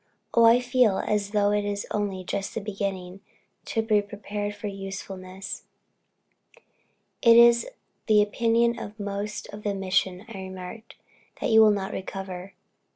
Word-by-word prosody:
Oh, 230 Hz, -, +6 dB
I 230 Hz, +2 st, +7 dB
feel 245 Hz, -5 st, +3 dB
as 205 Hz, 0 st, -1 dB
though 205 Hz, -1 st, +2 dB, 0.4 s
only 200 Hz, -3 st, -2 dB
just 200 Hz, +3 st, -4 dB
beginning 195 Hz, -2 st, -4 dB, 0.4 s
to 225 Hz, -, -1 dB
be 215 Hz, -2 st, +3 dB
prepared 205 Hz, 0 st, -5 dB
for 205 Hz, -, -9 dB
usefulness." 195 Hz, -1 st, -7 dB, 1.6 s
"It 230 Hz, -2 st, +7 dB
is 235 Hz, 0 st, +6 dB, 0.4 s
the 210 Hz, -2 st, +6 dB
opinion 230 Hz, +2 st, +1 dB
of 210 Hz, +2 st, -8 dB
most 205 Hz, +1 st, -4 dB
of 210 Hz, -, -8 dB
the 205 Hz, -1 st, -2 dB
mission," 190 Hz, 0 st, 0 dB
I 220 Hz, -4 st, -8 dB
remarked, 190 Hz, +4 st, -8 dB, 0.4 s
"that -, -, -1 dB
you 220 Hz, 0 st, +8 dB
will 215 Hz, -, +7 dB
not 200 Hz, -2 st, -1 dB
recover." 190 Hz, 0 st, -6 dB
205 Hz, 135 wpm, -26 LUFS, 195-220 Hz, 1.6 s, you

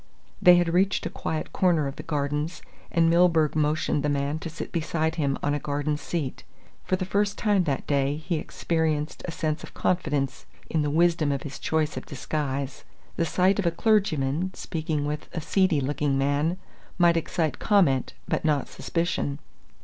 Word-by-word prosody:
They 180 Hz, 0 st, +8 dB
had 175 Hz, -1 st, +2 dB
reached 190 Hz, +2 st, +2 dB
a -, -, -3 dB
quiet 155 Hz, -1 st, -4 dB
corner 170 Hz, -5 st, +3 dB
of 135 Hz, 0 st, -4 dB
the -, -, -7 dB
Gardens 150 Hz, +3 st, -2 dB, 0.3 s
and 165 Hz, -1 st, +3 dB
Milburgh 165 Hz, -3 st, +4 dB
motioned 150 Hz, -1 st, +1 dB
the 150 Hz, -, 0 dB
man 145 Hz, +2 st, -1 dB
to 165 Hz, -, -5 dB
sit 160 Hz, -, -7 dB
beside 160 Hz, -1 st, 0 dB
him 140 Hz, -4 st, 0 dB
on 145 Hz, -, +1 dB
a 145 Hz, -, 0 dB
garden 145 Hz, +1 st, -1 dB
seat. 150 Hz, -2 st, -4 dB, 0.4 s
For 185 Hz, -, +1 dB
the 185 Hz, 0 st, -3 dB
first 200 Hz, +2 st, 0 dB
time 205 Hz, -4 st, +2 dB
that 140 Hz, -4 st, -1 dB
day 140 Hz, 0 st, +1 dB
he 160 Hz, +2 st, -2 dB
experienced 155 Hz, -1 st, -1 dB
a -, -, -3 dB
sense 155 Hz, -1 st, -2 dB
of -, -, -11 dB
confidence 150 Hz, -7 st, -1 dB, 0.2 s
in 160 Hz, -, +2 dB
the 145 Hz, -, 0 dB
wisdom 165 Hz, -1 st, +3 dB
of 140 Hz, -1 st, -2 dB
his 140 Hz, -1 st, -7 dB
choice 155 Hz, -1 st, 0 dB
of -, -, -6 dB
disguise. 140 Hz, -1 st, -3 dB, 0.3 s
The 165 Hz, -, +1 dB
sight 185 Hz, +4 st, +2 dB
of 190 Hz, -, +1 dB
a -, -, +6 dB
clergyman 175 Hz, -, +1 dB
speaking 155 Hz, -2 st, -2 dB
with 150 Hz, 0 st, -4 dB
a 170 Hz, -, -2 dB
seedy 185 Hz, -1 st, +2 dB
looking 140 Hz, 0 st, 0 dB
man 145 Hz, +5 st, +1 dB, 0.4 s
might 175 Hz, -1 st, +5 dB
excite 160 Hz, -3 st, -1 dB
comment, 175 Hz, -, +3 dB
but -, -, -1 dB
not 150 Hz, -3 st, +1 dB
suspicion. 165 Hz, -4 st, -2 dB
155 Hz, 180 wpm, -26 LUFS, 145-170 Hz, 0.4 s, They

